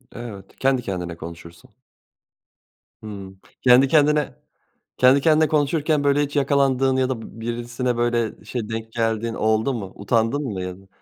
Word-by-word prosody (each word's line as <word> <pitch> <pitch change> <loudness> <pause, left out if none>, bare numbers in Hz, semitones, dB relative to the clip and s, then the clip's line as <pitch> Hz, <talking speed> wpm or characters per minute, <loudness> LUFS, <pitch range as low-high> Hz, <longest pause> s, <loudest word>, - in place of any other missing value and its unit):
Evet, 105 -5 -9
kendi 130 -1 +2
kendine 90 -6 -5
konuşursun. 85 0 -11 1.3
Hımm, 100 -3 -9 0.2
kendi 130 +2 +6
kendine 150 0 +2 0.6
kendi 130 +2 +5
kendine 155 +1 +4
konuşurken, 150 0 +1
böyle, 145 +1 +3
hiç 145 0 -4
yakalandığın 135 -2 +2
ya 130 -1 +1
da 130 -3 -3
b 115 - -11
birisine, 120 +1 -3
böyle, 120 -2 -1
şey, 110 0 -4
denk 115 0 -5
geldiğin 115 0 -1
oldu 110 +5 +1
mu? 100 -5 -6
Utandın 115 +7 0
mı 100 -7 -4
ya 90 0 -5
da? 95 - -20
120 Hz, 145 wpm, -22 LUFS, 110-135 Hz, 1.3 s, kendi